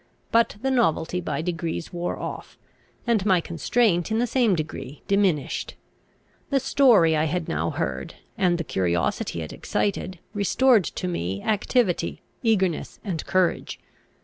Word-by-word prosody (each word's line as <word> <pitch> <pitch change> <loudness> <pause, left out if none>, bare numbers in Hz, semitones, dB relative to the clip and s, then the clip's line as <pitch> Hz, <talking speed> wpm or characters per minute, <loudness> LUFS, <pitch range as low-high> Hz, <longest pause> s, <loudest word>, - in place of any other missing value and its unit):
But 230 -1 +3
the 265 - +1
novelty 180 -6 +1
by 165 - -3
degrees 165 -1 -3
wore 175 0 -2
off, - - -7 0.5
and 230 -5 +2
my 190 -3 +4
constraint 175 - +1
in 220 - 0
the 240 - +2
same 235 -5 +2
degree 155 -3 -6
diminished. 195 -8 0 0.7
The 275 - +3
story 240 - +5
I 155 +1 +2
had 165 +1 -2
now 80 +2 -1
heard, 65 0 -3 0.2
and 180 -2 +2
the 170 - -2
curiosity 85 - -1
it 80 - -8
excited, 190 -2 -2 0.2
restored 215 +1 +3
to 180 - -4
me 95 - -3
activity, 215 -2 0 0.2
eagerness, 190 -8 0
and 180 -7 -3
courage. 185 -2 0
180 Hz, 140 wpm, -25 LUFS, 160-220 Hz, 0.7 s, story